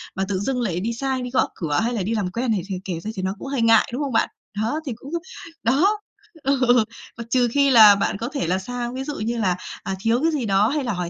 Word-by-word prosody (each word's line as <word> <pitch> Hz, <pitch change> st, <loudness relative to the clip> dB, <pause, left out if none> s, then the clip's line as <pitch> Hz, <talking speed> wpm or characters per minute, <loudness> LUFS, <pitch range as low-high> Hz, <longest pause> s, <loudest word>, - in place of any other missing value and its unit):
mà 190 Hz, -, -1 dB
tự 190 Hz, -2 st, -1 dB
dưng 250 Hz, +4 st, -1 dB
lại 180 Hz, -7 st, -1 dB
đi 230 Hz, +4 st, -2 dB
sai 265 Hz, +1 st, -2 dB
đi 250 Hz, -, -4 dB
gõ 260 Hz, -, +2 dB
cửa, 150 Hz, -4 st, -1 dB
hay 240 Hz, +2 st, 0 dB
là 205 Hz, -5 st, -1 dB
đi 225 Hz, +4 st, -1 dB
làm 190 Hz, -4 st, -1 dB
quen 235 Hz, +2 st, -1 dB
này 205 Hz, -, +1 dB
thì 195 Hz, -, -3 dB
kể 175 Hz, -4 st, -3 dB
ra 215 Hz, +6 st, -5 dB
thì 190 Hz, -, -3 dB
nó 190 Hz, -, -1 dB
cũng -, -, -7 dB
hơi 270 Hz, -3 st, -1 dB
ngại, 225 Hz, -1 st, +5 dB
đúng 275 Hz, -, -2 dB
không 270 Hz, -4 st, -3 dB
bạn? -, -, +2 dB, 0.3 s
Đó, 235 Hz, +8 st, -1 dB
thì 265 Hz, -, -3 dB
cũng 270 Hz, +5 st, -11 dB, 0.5 s
đó, 365 Hz, -, +3 dB, 0.4 s
ừ, 255 Hz, -4 st, +3 dB, 0.3 s
mà 235 Hz, -, -5 dB
trừ 245 Hz, 0 st, +3 dB
khi 280 Hz, +1 st, +3 dB
là 215 Hz, -5 st, +9 dB
bạn 200 Hz, -, -1 dB
có 235 Hz, +3 st, -4 dB
thể 275 Hz, -, -1 dB
là 185 Hz, +2 st, +1 dB
sang, 245 Hz, +3 st, -4 dB
ví 265 Hz, +1 st, -4 dB
dụ 295 Hz, 0 st, -5 dB
như 230 Hz, +2 st, -2 dB
là, 185 Hz, -5 st, +1 dB, 0.3 s
à, 190 Hz, -, -3 dB
thiếu 230 Hz, +4 st, +1 dB
cái 325 Hz, +1 st, +2 dB
gì 275 Hz, -6 st, -1 dB
đó, 200 Hz, +1 st, +3 dB
hay 290 Hz, +1 st, -1 dB
là 240 Hz, -4 st, -1 dB
hỏi 180 Hz, -1 st, -3 dB
235 Hz, 280 wpm, -22 LUFS, 200-260 Hz, 0.5 s, là